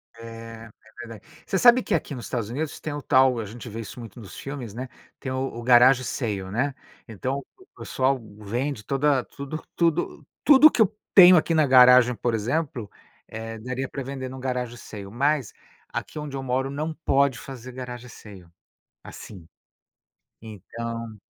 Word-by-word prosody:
É, 115 Hz, -, -13 dB, 0.4 s
é -, -, -13 dB, 0.3 s
verdade. 115 Hz, -4 st, -10 dB, 0.2 s
Você 195 Hz, -, -1 dB
sabe 240 Hz, +4 st, +6 dB
que -, -, -2 dB
aqui 140 Hz, -, -1 dB
nos 120 Hz, -, -7 dB
Estados 115 Hz, -4 st, -3 dB
Unidos 145 Hz, +5 st, -4 dB
tem 155 Hz, -, -5 dB
o 145 Hz, -, -5 dB
tal 130 Hz, -2 st, +3 dB
a 110 Hz, -, -4 dB
gente 115 Hz, +4 st, -9 dB
vê 115 Hz, +1 st, -6 dB
isso 115 Hz, -, -9 dB
muito 115 Hz, -1 st, -10 dB
nos 105 Hz, -5 st, -11 dB
filmes, 135 Hz, -6 st, -7 dB
né, 125 Hz, +3 st, -6 dB, 0.3 s
tem 130 Hz, -, -5 dB
o 130 Hz, -, -2 dB, 0.2 s
o 120 Hz, -, -6 dB
garage 125 Hz, +2 st, +6 dB
sale, 105 Hz, -7 st, -3 dB
né. 130 Hz, +6 st, 0 dB, 0.3 s
Então 130 Hz, +5 st, -4 dB
o 375 Hz, -, -19 dB
pessoal 130 Hz, 0 st, 0 dB, 0.2 s
vende 120 Hz, +4 st, -3 dB
toda 135 Hz, +1 st, +1 dB
tudo 140 Hz, +3 st, -7 dB
tudo 170 Hz, -1 st, 0 dB, 0.2 s
tudo 295 Hz, +1 st, +8 dB
o -, -, +2 dB
que 230 Hz, -, +1 dB
eu 210 Hz, -, +3 dB, 0.2 s
tenho 185 Hz, -1 st, +10 dB
aqui 165 Hz, +1 st, +1 dB
na 155 Hz, -2 st, +4 dB
garagem, 125 Hz, -1 st, +7 dB
por 120 Hz, +1 st, -1 dB
exemplo, 120 Hz, 0 st, -2 dB, 0.4 s
eh, 115 Hz, 0 st, -7 dB
daria 130 Hz, +3 st, -4 dB
para 140 Hz, -, -5 dB
vender 130 Hz, 0 st, -6 dB
num 130 Hz, +1 st, -8 dB
garage 125 Hz, -2 st, -3 dB
sale, 100 Hz, -3 st, -9 dB
mas 135 Hz, +2 st, 0 dB, 0.4 s
aqui -, -, -6 dB
onde 150 Hz, -2 st, -6 dB
eu 135 Hz, -, -5 dB
moro 130 Hz, +1 st, -1 dB
não 155 Hz, +3 st, -3 dB
pode 140 Hz, -4 st, +1 dB
fazer 130 Hz, -2 st, -9 dB
garage 125 Hz, -1 st, -8 dB
sale 100 Hz, -6 st, -13 dB, 0.6 s
assim. 95 Hz, -6 st, -11 dB, 0.9 s
Então 115 Hz, +1 st, -7 dB
130 Hz, 175 wpm, -25 LUFS, 115-140 Hz, 0.9 s, tenho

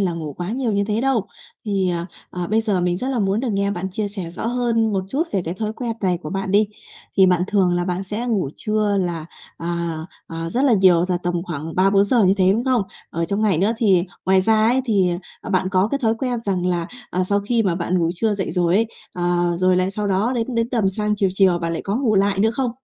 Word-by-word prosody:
là 185 Hz, -3 st, +1 dB
ngủ 160 Hz, -3 st, -5 dB
quá 175 Hz, +6 st, -5 dB
nhiều 240 Hz, -1 st, -1 dB
như 200 Hz, 0 st, +1 dB
thế 210 Hz, +2 st, -1 dB
đâu. 250 Hz, -6 st, +1 dB, 0.4 s
Thì, 195 Hz, -3 st, 0 dB
à, 170 Hz, 0 st, -2 dB, 0.2 s
à, 180 Hz, -1 st, -4 dB
bây 220 Hz, +1 st, +3 dB
giờ 210 Hz, -5 st, 0 dB
mình 175 Hz, 0 st, 0 dB
rất 255 Hz, -, -3 dB
là 265 Hz, -2 st, -1 dB
muốn 200 Hz, 0 st, +1 dB
được 260 Hz, -, -2 dB
nghe 200 Hz, 0 st, 0 dB
bạn 190 Hz, -1 st, -3 dB
chia 205 Hz, +2 st, -2 dB
sẻ 195 Hz, -5 st, -6 dB
rõ 185 Hz, +5 st, -5 dB
hơn 230 Hz, -2 st, +1 dB
một 190 Hz, -1 st, -1 dB
chút 275 Hz, +9 st, 0 dB
về 190 Hz, -, 0 dB
cái 165 Hz, -, -3 dB
thói 215 Hz, +2 st, -3 dB
quen 235 Hz, 0 st, -3 dB
này 180 Hz, -3 st, +1 dB
của 150 Hz, -, -6 dB
bạn 195 Hz, 0 st, -3 dB
đi. 210 Hz, +1 st, +4 dB, 0.5 s
Thì 190 Hz, -, +6 dB
bạn 180 Hz, -1 st, +3 dB
thường 190 Hz, -4 st, +2 dB
là 175 Hz, 0 st, 0 dB
bạn 180 Hz, +1 st, -2 dB
sẽ 210 Hz, +5 st, -4 dB
ngủ 205 Hz, -, 0 dB
trưa 215 Hz, -1 st, 0 dB
là, 170 Hz, -3 st, -3 dB, 0.3 s
à, 170 Hz, -1 st, -3 dB, 0.3 s
à, 165 Hz, 0 st, -5 dB
rất 250 Hz, -, 0 dB
là 270 Hz, -, +4 dB
nhiều, 185 Hz, -4 st, +5 dB
là 180 Hz, -, +1 dB
tầm 175 Hz, -1 st, -2 dB
khoảng 160 Hz, -2 st, -5 dB
3-4 195 Hz, +2 st, +4 dB
giờ 225 Hz, +1 st, +3 dB
như 190 Hz, +1 st, +4 dB
thế, 190 Hz, -1 st, +4 dB
đúng 230 Hz, +4 st, -1 dB
không? 255 Hz, -4 st, +2 dB, 0.3 s
Ở 170 Hz, +1 st, -1 dB
trong 200 Hz, +4 st, -1 dB
ngày 195 Hz, -7 st, +2 dB
nữa 195 Hz, +5 st, +2 dB
thì 195 Hz, -6 st, +3 dB, 0.2 s
ngoài 190 Hz, 0 st, +5 dB
ra 220 Hz, +2 st, +3 dB
ấy, 255 Hz, +2 st, +3 dB
thì, 200 Hz, -7 st, +2 dB, 0.3 s
ờ, -, -, -7 dB
bạn 185 Hz, -1 st, +1 dB
có 190 Hz, +1 st, +2 dB
cái 280 Hz, -, -1 dB
thói 225 Hz, -1 st, +3 dB
quen 250 Hz, -2 st, -1 dB
rằng 185 Hz, -3 st, 0 dB
là, 175 Hz, -2 st, 0 dB, 0.2 s
à, 185 Hz, 0 st, 0 dB
sau 200 Hz, +2 st, +1 dB
khi 225 Hz, +3 st, +1 dB
mà 190 Hz, -5 st, +1 dB
bạn 175 Hz, +1 st, 0 dB
ngủ 165 Hz, -1 st, +1 dB
trưa 215 Hz, +3 st, +1 dB
dậy 195 Hz, -2 st, -3 dB
rồi 175 Hz, -1 st, +1 dB
ấy, 225 Hz, +3 st, +3 dB, 0.3 s
ờ, 175 Hz, 0 st, 0 dB
rồi 185 Hz, 0 st, +3 dB
lại 185 Hz, +1 st, +1 dB
sau 205 Hz, +1 st, -3 dB
đó 200 Hz, +6 st, +1 dB
đến 240 Hz, +1 st, -2 dB
đến 230 Hz, 0 st, +1 dB
tầm 225 Hz, -6 st, +1 dB
sang 210 Hz, +2 st, -1 dB
chiều 200 Hz, -1 st, +2 dB
chiều 190 Hz, -2 st, +3 dB
bạn 170 Hz, -1 st, -2 dB
lại 165 Hz, -, -3 dB
có 200 Hz, +2 st, -1 dB
ngủ 245 Hz, -4 st, +1 dB
lại 195 Hz, 0 st, +2 dB
nữa 220 Hz, +3 st, +3 dB
không? 245 Hz, +1 st, -1 dB
195 Hz, 265 wpm, -21 LUFS, 180-220 Hz, 0.5 s, Thì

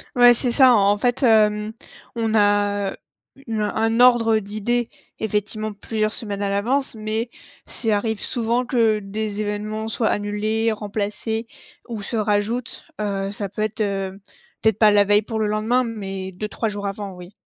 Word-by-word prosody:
Ouais, 245 Hz, 0 st, +8 dB
c'est 240 Hz, +1 st, 0 dB
ça, 260 Hz, -1 st, +6 dB
en 205 Hz, 0 st, +4 dB
fait, 245 Hz, +5 st, 0 dB
hem, 215 Hz, -2 st, +3 dB, 0.4 s
on 225 Hz, -1 st, -1 dB
a, 205 Hz, -1 st, +2 dB
heu, -, -, -14 dB, 0.5 s
une 220 Hz, -2 st, -2 dB
un 210 Hz, -, -2 dB
un 225 Hz, +1 st, +1 dB
ordre 230 Hz, -3 st, +5 dB
d'idée, 215 Hz, +4 st, -2 dB, 0.3 s
effectivement 215 Hz, 0 st, -1 dB
plusieurs 215 Hz, +1 st, -2 dB
semaines 205 Hz, -4 st, -2 dB
à 200 Hz, -, 0 dB
l'avance 240 Hz, +6 st, 0 dB
mais 220 Hz, +2 st, -2 dB, 0.4 s
c'est 225 Hz, -2 st, -1 dB
arrive 215 Hz, +1 st, 0 dB
souvent 240 Hz, +1 st, 0 dB
que 225 Hz, -4 st, +2 dB
des 210 Hz, +1 st, -3 dB
événements 215 Hz, +1 st, -3 dB
soient 225 Hz, 0 st, 0 dB
annulés, 215 Hz, +2 st, 0 dB
remplacés 215 Hz, +2 st, -3 dB, 0.4 s
ou 225 Hz, -3 st, -5 dB
se 230 Hz, -, -4 dB
rajoutent, 215 Hz, +3 st, -1 dB
heu, 195 Hz, -1 st, -2 dB
ça 205 Hz, -1 st, -4 dB
peut 215 Hz, -, -5 dB
être, 215 Hz, +1 st, -2 dB
heu, 195 Hz, -1 st, -2 dB, 0.4 s
peut-être 220 Hz, -2 st, +2 dB
pas 215 Hz, -1 st, +7 dB
la 205 Hz, 0 st, +5 dB
veille 205 Hz, +1 st, +4 dB
pour 220 Hz, +1 st, -5 dB
le 215 Hz, -, +1 dB
lendemain, 220 Hz, +4 st, +1 dB
mais 195 Hz, -4 st, -5 dB
2-3 210 Hz, +4 st, -3 dB
jours 205 Hz, -1 st, -4 dB
avant, 200 Hz, -1 st, -5 dB
oui. 180 Hz, +2 st, -12 dB
215 Hz, 170 wpm, -22 LUFS, 205-225 Hz, 0.5 s, Ouais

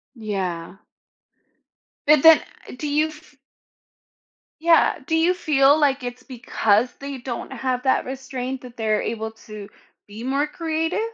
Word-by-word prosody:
Yeah. 190 Hz, -6 st, -4 dB, 1.3 s
But 300 Hz, -2 st, +6 dB
then 325 Hz, 0 st, +8 dB, 0.4 s
do 300 Hz, -, -4 dB
you 300 Hz, +2 st, +2 dB
f 310 Hz, 0 st, -15 dB
f -, -, -31 dB, 1.3 s
Yeah, 335 Hz, -1 st, +4 dB
do 320 Hz, -, +1 dB
you 330 Hz, +3 st, +3 dB
feel 295 Hz, -5 st, +3 dB
like 275 Hz, -2 st, +2 dB
it's 245 Hz, +1 st, -6 dB
because 245 Hz, -3 st, 0 dB
they 280 Hz, 0 st, -6 dB
don't 245 Hz, -1 st, -6 dB
have 255 Hz, -1 st, -2 dB
that 260 Hz, -, +2 dB
restraint 260 Hz, 0 st, -5 dB
that 245 Hz, -1 st, -12 dB
they're 215 Hz, -2 st, 0 dB
able 220 Hz, -1 st, -3 dB, 0.2 s
to 210 Hz, -1 st, -9 dB, 0.4 s
be 210 Hz, +2 st, -10 dB
more 275 Hz, +4 st, 0 dB
creative? 325 Hz, +3 st, -2 dB
265 Hz, 140 wpm, -22 LUFS, 230-300 Hz, 1.3 s, then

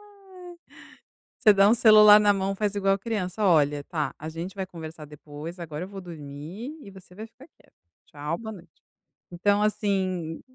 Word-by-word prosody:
Ai. 370 Hz, -3 st, -14 dB, 0.8 s
Você 215 Hz, -, +6 dB
dá 195 Hz, 0 st, +5 dB
um 220 Hz, -, +5 dB
celular 215 Hz, -2 st, +8 dB
na 205 Hz, -1 st, +4 dB
mão, 195 Hz, 0 st, -2 dB
faz 205 Hz, 0 st, -2 dB
igual 195 Hz, -1 st, +1 dB
criança: 205 Hz, -1 st, -3 dB
"Olha, 145 Hz, -5 st, +2 dB
tá, 155 Hz, -2 st, -3 dB
a 155 Hz, -, -7 dB
gente 165 Hz, +4 st, -7 dB
vai 190 Hz, -2 st, -4 dB
conversar 160 Hz, -3 st, -10 dB
depois, 150 Hz, +3 st, -10 dB
agora 160 Hz, -1 st, -6 dB
eu -, -, -10 dB
vou 195 Hz, -1 st, -9 dB
dormir 170 Hz, -, -9 dB
e 200 Hz, -, -12 dB
você 190 Hz, -2 st, -16 dB
vai 215 Hz, +4 st, -8 dB
ficar 245 Hz, +5 st, -18 dB
quieto. -, -, -27 dB, 0.3 s
Tchau, 150 Hz, +3 st, -5 dB
boa 220 Hz, -1 st, -7 dB
noite". 175 Hz, -5 st, -16 dB, 0.5 s
Então 200 Hz, +4 st, +1 dB
assim 185 Hz, -6 st, -1 dB
190 Hz, 175 wpm, -25 LUFS, 160-210 Hz, 0.8 s, celular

